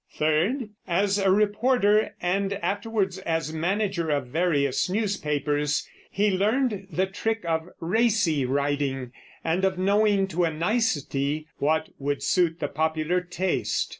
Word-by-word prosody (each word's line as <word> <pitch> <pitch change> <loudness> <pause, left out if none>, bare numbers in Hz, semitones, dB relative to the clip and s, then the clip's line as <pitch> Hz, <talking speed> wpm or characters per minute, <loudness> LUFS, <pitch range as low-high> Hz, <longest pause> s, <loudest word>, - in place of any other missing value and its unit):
Third, 185 - 0 0.2
as 195 +3 +1
a 195 -1 +2
reporter, 210 +2 +3
and 195 +3 0
afterwards 200 0 -1
as 165 -4 -2
manager 185 +1 -1
of 145 -3 0
various 150 -2 +1
newspapers, 150 -8 -1 0.2
he 205 +1 +1
learned 205 +1 0
the 185 +2 +1
trick 220 +2 -3
of 165 +1 -1
racy 190 - +2
writing, 140 -1 -1 0.3
and 170 +4 0
of 190 -1 +1
knowing 200 +1 +3
to 175 0 0
a 165 - +2
nicety 155 - 0
what 160 +2 +1
would 145 0 -2
suit 175 -2 +2
the 145 - -1
popular 160 +4 0
taste. 180 +1 -1
180 Hz, 130 wpm, -26 LUFS, 155-200 Hz, 0.3 s, reporter